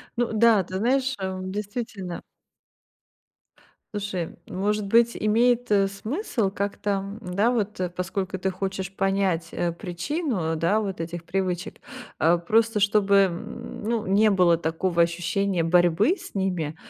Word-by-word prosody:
Ну 240 0 0
да, 220 -2 +5
ты 185 +2 -5
знаешь, 265 +5 +1
э, 190 -1 -3
действительно. 205 -1 -5 1.7
Слушай, 200 -5 -3
может 205 +2 -1
быть, 235 +3 +3
имеет, 235 +2 +2
э, 195 -1 +4
смысл 220 - -2
как-то, 200 0 -2 0.2
да, 200 +5 +1
вот, 210 -4 -2
э, 180 - -1
поскольку 185 +1 -3
ты 190 +1 -1
хочешь 190 0 -4
понять, 195 -4 0
э, 170 -1 0
причину, 180 - -2
да, 200 +7 +2
вот 195 -4 -4
этих 165 +1 -5
привычек, 180 0 -2 0.4
а, 170 +2 +4
просто 220 +4 +2
чтобы, 200 -1 +3
м, 225 +8 -8
ну, 225 0 -1
не 205 +3 +4
было 180 -4 +4
такого 170 +2 0
ощущения 175 +2 0
борьбы 175 - +3
с - - -12
ними, 180 -6 -1
195 Hz, 135 wpm, -25 LUFS, 180-215 Hz, 1.7 s, да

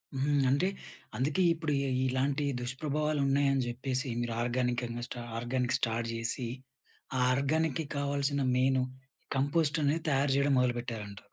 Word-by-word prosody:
హ్మ్, 140 +1 +2
అంటే 145 +8 +3 0.5
అందుకే 150 +8 +1
ఇప్పుడు 160 -2 -3
ఇ 140 - 0 0.2
ఇలాంటి 135 +3 0 0.2
దుష్ప్రభావాలు 150 +3 -1
ఉన్నాయని 135 -1 +3
చెప్పేసి 130 +2 -2
మీరు 120 -1 -2
ఆర్గానికంగా 120 -1 -1
స్టా 120 - -6 0.2
ఆర్గానిక్ 125 +1 0
స్టార్ట్ 115 -1 -1
జేసి, 115 +2 -2 0.7
ఆ - - +1
ఆర్గానిక్‍కి 155 +3 +1
కావాల్సిన 140 0 0
మెయిను 130 0 +3 0.5
కంపోస్ట్ 150 +2 +2
అనేది 155 +3 +1
తయారు 140 -1 +2
చేయడం 140 0 +3
మొదలుపెట్టారంట. 120 -5 -2
135 Hz, 125 wpm, -31 LUFS, 125-145 Hz, 0.7 s, అంటే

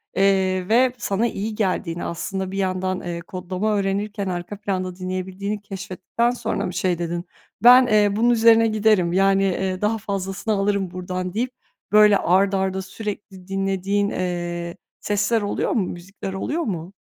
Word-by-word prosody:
eee, 190 -1 +2
ve 250 +2 +4
sana 225 +1 0
iyi 215 0 -4
geldiğini, 180 -4 -1
aslında 190 +2 -4
bir 195 - -5
yandan, 185 -1 -1
eee, 170 -1 -4
kodlama 185 +4 -2
öğrenirken 200 +1 -1
arka 180 +3 -4
planda 185 -3 -3
dinleyebildiğini 190 +3 -4
keşfettikten 200 +4 -2
sonra 235 -2 -2
mı 180 - -4
şey 180 -1 0
dedin? 170 +1 -3 0.4
Ben, 250 +1 +9
eee, 205 -2 +3
bunun 235 +3 +3
üzerine 230 -1 +5
giderim. 210 -5 +2
Yani, 195 +1 +3
eee, 190 0 -1
daha 220 +2 +1
fazlasını 195 0 -3
alırım 195 -2 0
buradan 185 0 -4
deyip 245 +4 -1 0.4
böyle 210 -1 +7
art 195 +3 +2
arda 190 0 0
sürekli 195 -1 -7
dinlediğin, 195 +1 0
eee, 175 -1 -3 0.2
sesler 210 +2 +1
oluyor 205 - -1
mu? 205 -6 +1
Müzikler 190 +2 -7
oluyor 300 - -2
mu? 180 -2 -4
195 Hz, 150 wpm, -22 LUFS, 185-210 Hz, 0.4 s, Ben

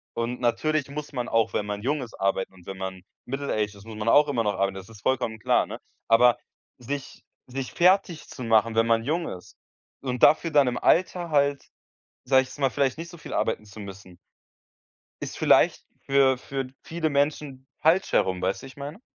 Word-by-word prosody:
Und 115 +1 -3
natürlich 145 +4 0
muss 150 +1 -7
man 125 -3 -3
auch, 115 -1 +1
wenn 105 - -1
man 105 0 -4
jung 145 +5 -1
ist, 120 -3 -9
arbeiten 95 0 0
und 90 -2 -18
wenn 95 - -7
man 95 -1 -5 0.2
middle-aged 120 -6 -2
ist, 100 +1 -15
muss 110 -1 -9
man 110 +2 -1
auch 150 +4 +6
immer 125 -5 0
noch 105 -1 0
arbeiten. 100 0 0
Das 95 +1 -9
ist 110 -2 -14
vollkommen 120 -3 -1
klar, - - +2
ne? - - -6 0.3
Aber 120 +1 +5 0.4
sich 135 +3 -6 0.2
sich 130 +1 -5
fertigzumachen, 145 - +2
wenn 115 +1 +3
man 115 0 +2
jung 165 +6 -1
ist 90 - -10 0.5
und 125 -2 -3
dafür 165 +2 +5
dann 145 -3 +5
im 125 0 -1
Alter 175 -1 +2
halt, 140 -1 +2 0.6
sage 130 +1 +5
ich 130 - -9
jetzt - - -12
mal, 135 -2 +2
vielleicht 140 +2 0
nicht 170 +1 -7
so 175 - -12
viel - - -8
arbeiten 110 -1 -1
zu 105 +1 -11
müssen 95 -3 -10 1.1
ist - - -6
vielleicht - - +3 0.2
für 135 -1 +4
für 135 0 -4
viele 160 -2 -2
Menschen 140 -2 -1
falsch 170 +4 +3
herum, 95 -1 +1
weißt 95 +7 -1
du, - - -8
wie 135 - -9
ich 130 - -15
meine? 145 +7 -8
125 Hz, 200 wpm, -26 LUFS, 110-145 Hz, 1.1 s, auch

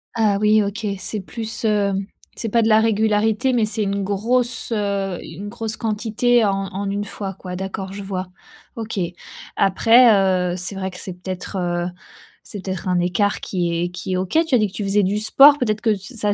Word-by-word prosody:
Ah 215 -3 +2
oui 215 0 +4
OK. 210 +2 -4
C'est 210 +3 -3
plus, 225 +3 -6
hem, 200 -2 +1 0.3
c'est 225 - -4
pas 230 +2 +3
de 220 - +2
la 215 0 +6
régularité 220 +3 +2
mais 235 -3 +2
c'est 215 0 -1
une 200 0 -1
grosse, 235 +5 0
heu, 200 -3 -1
une 195 +6 -8
grosse 220 +1 -4
quantité 225 +2 +1
en 195 -1 0
en 200 +1 -3
une 200 +1 -2
fois 200 -1 -6
quoi, 180 -1 -8
d'accord 190 +1 -5
je 200 0 -6
vois. 190 -1 -4 0.5
OK. 225 -3 -4 0.6
Après, 230 +5 +5 0.4
heu, - - -3
c'est 185 +2 -4
vrai 190 0 -3
que 180 - -11
c'est 185 - -6
peut-être, 185 +2 -6
heu, 175 -1 -1 0.6
c'est 200 -2 -8
peut-être 190 -1 -4
un 180 -1 +2
écart 180 +3 0
qui 175 -3 -2
est 175 - -1
qui 180 +1 -5
est - - +1
OK, 185 - -1
tu 265 - +3
as - - +6
dit 215 - +2
que 190 - -15
tu 210 - -4
faisais 200 +1 +2
du 195 +2 0
sport, 275 +7 +7
peut-être 215 -5 -1
que 220 -3 +2
ça 205 0 -2
205 Hz, 205 wpm, -21 LUFS, 190-220 Hz, 0.6 s, sport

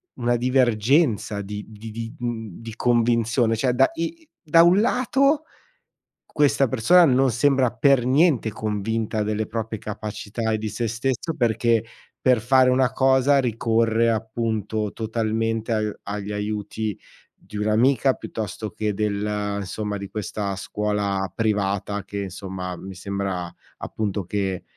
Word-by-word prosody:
una 120 0 +1
divergenza 120 -2 +2
di 105 +1 -6
di 110 +1 -10
di, 115 +1 -6
mhmm, 115 -5 -5
di 115 -1 -8
convinzione. 115 -1 +2
Cioè 125 +2 +1
da 135 +2 +4
i 310 - -5
da 165 0 +5
un 175 +3 +5
lato 270 +5 +2 0.8
questa 140 -3 +2
persona 155 +10 +5
non 135 -3 +4
sembra 130 +2 +2
per 140 -4 +3
niente 135 -4 +3
convinta 110 +1 -2
delle 105 +1 -1
proprie 110 0 -4
capacità 110 +2 -4
e 110 - 0
di 110 0 -3
sé 115 +1 -2
stesso, 130 +7 -2
perché 115 -2 +2 0.4
per 125 -3 +3
fare 130 +3 +4
una 130 0 +2
cosa 135 +1 +4
ricorre, 115 -1 +1
appunto, 110 -1 -2
totalmente 115 0 -1
a 110 -1 +1 0.3
agli 105 0 -4
aiuti 105 0 -3 0.4
di 105 - -12
un'amica, 120 +5 +3
piuttosto 110 0 -5
che 105 -1 -2
del, 105 0 -1
insomma, 105 +2 -4
di 100 - -7
questa 100 -1 -3
scuola 100 -2 -2
privata 100 -2 -1
che, 100 0 -5
insomma, 95 -1 -6
mi 95 +2 -9
sembra, 95 -1 -4 0.3
appunto, 105 -3 -3
che 95 -1 -2
110 Hz, 135 wpm, -23 LUFS, 105-125 Hz, 0.8 s, da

